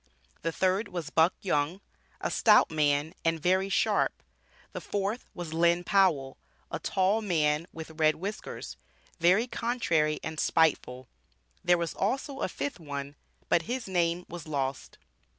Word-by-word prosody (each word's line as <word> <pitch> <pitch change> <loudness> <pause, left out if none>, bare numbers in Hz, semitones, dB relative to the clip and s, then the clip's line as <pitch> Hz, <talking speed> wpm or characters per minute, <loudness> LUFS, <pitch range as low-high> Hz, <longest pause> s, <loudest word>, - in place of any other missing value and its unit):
The 165 - -1
third 190 +5 +1
was 165 -4 -5
"Buck 160 +2 +4
Young, 165 0 0 0.4
a - - -2
stout - - +5
man, 150 0 +1
and 165 0 +1
very 185 +4 +2
sharp." - - +1 0.5
The - - -6
fourth 205 +4 -3
was 175 -3 -6
"Lynn 170 +1 +3
Powell, 175 -10 +2 0.3
a - - -3
tall 195 +4 +1
man 160 -5 +1
with 160 0 -9
red 155 0 +4
whiskers, 200 +5 -6 0.4
very 185 +7 +4
contrary 205 -12 0
and 160 -1 -5
spiteful." 130 -7 +1 0.6
There 175 0 +4
was 170 -2 -2
also 270 +6 -2
a - - -1
fifth 280 -8 -4
one, 140 -3 -6 0.3
but 170 - +3
his 245 -2 -3
name 175 -1 0
was 170 -2 -8
lost. 135 -3 -3
170 Hz, 145 wpm, -29 LUFS, 155-195 Hz, 0.6 s, stout